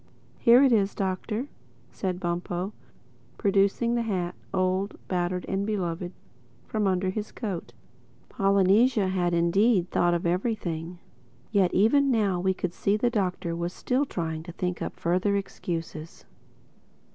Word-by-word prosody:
"Here 240 +3 +7
it 270 - +5
is, 205 -3 +2
Doctor," 205 +6 -2 0.4
said 185 -2 -3
Bumpo 175 +2 -3 0.6
producing 200 +4 +2
the 240 - +1
hat, 185 -6 -2 0.2
old, 190 +1 0
battered 180 0 -1
and 195 +1 -1
beloved, 180 -4 -2 0.5
from 215 -2 0
under 185 0 +1
his 210 +2 -4
coat. 185 - -5 0.5
Polynesia 200 +2 +3
had 175 -2 +1
indeed 180 +3 +3
thought 175 0 +3
of 170 - -2
everything. 175 -3 -2 0.5
Yet 195 -4 +3
even 275 +8 +4
now 205 -7 +2
we 190 +1 +1
could 180 -2 -3
see 200 +3 +1
the 240 +2 +1
Doctor 180 -5 -1
was 170 +1 -3
still 260 +3 0
trying 160 -6 -3
to 170 +2 -9
think 180 0 -3
up - - -5
further 185 +4 +1
excuses. 165 -4 -5
190 Hz, 135 wpm, -27 LUFS, 175-210 Hz, 0.6 s, Here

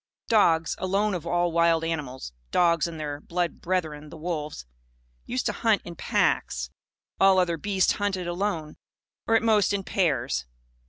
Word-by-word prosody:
Dogs, 165 -7 +4
alone 200 +3 +1
of 175 -4 -4
all 175 0 +1
wild 165 -1 +3
animals 140 - -4 0.2
(dogs 170 -2 +3
and 165 -2 -7
their 145 -1 -4
blood 175 +1 -2
brethren, 155 -5 -2
the 165 - -10
wolves), 155 - -4 0.6
used - - -2
to - - +2
hunt - - +1
in - - -7
packs. 60 0 0 0.5
All 195 -1 +6
other 180 -2 +2
beasts 190 +3 +1
hunted 200 -3 -1
alone 175 -4 -2 0.5
or, 225 - +4
at 225 - +3
most, 210 -3 +3
in 200 -1 -1
pairs. 150 - 0
170 Hz, 155 wpm, -26 LUFS, 155-190 Hz, 0.6 s, All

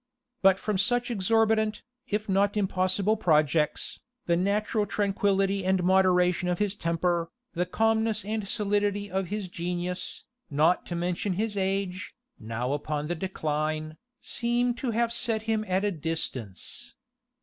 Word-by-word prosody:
But 190 -1 +6
from 210 -3 -1
such 245 +4 +1
exorbitant, 220 +1 +2 0.2
if 210 +1 -2
not 200 +1 +2
impossible 190 +1 +1
projects, 155 -4 +2 0.3
the 170 - +2
natural 205 +3 0
tranquillity 195 -1 +1
and 185 -1 +1
moderation 180 -1 +3
of 175 - 0
his 205 0 0
temper, 170 -2 0 0.2
the 180 0 -1
calmness 225 +1 +1
and 215 -1 -2
solidity 205 -1 0
of 190 0 -1
his 205 +1 -3
genius, 175 +1 -3 0.3
not 155 +4 +2
to 175 - -3
mention 175 +3 -1
his 210 +3 -2
age, 195 -1 -2 0.2
now 115 +4 -3
upon 150 +1 -3
the 175 - 0
decline, 155 -3 -2 0.2
seem 240 +1 +1
to 245 +1 -3
have 235 +1 +1
set 230 -2 +2
him 220 -1 0
at 185 +1 +1
a 205 - +1
distance. 150 - -4
190 Hz, 140 wpm, -27 LUFS, 175-210 Hz, 0.3 s, But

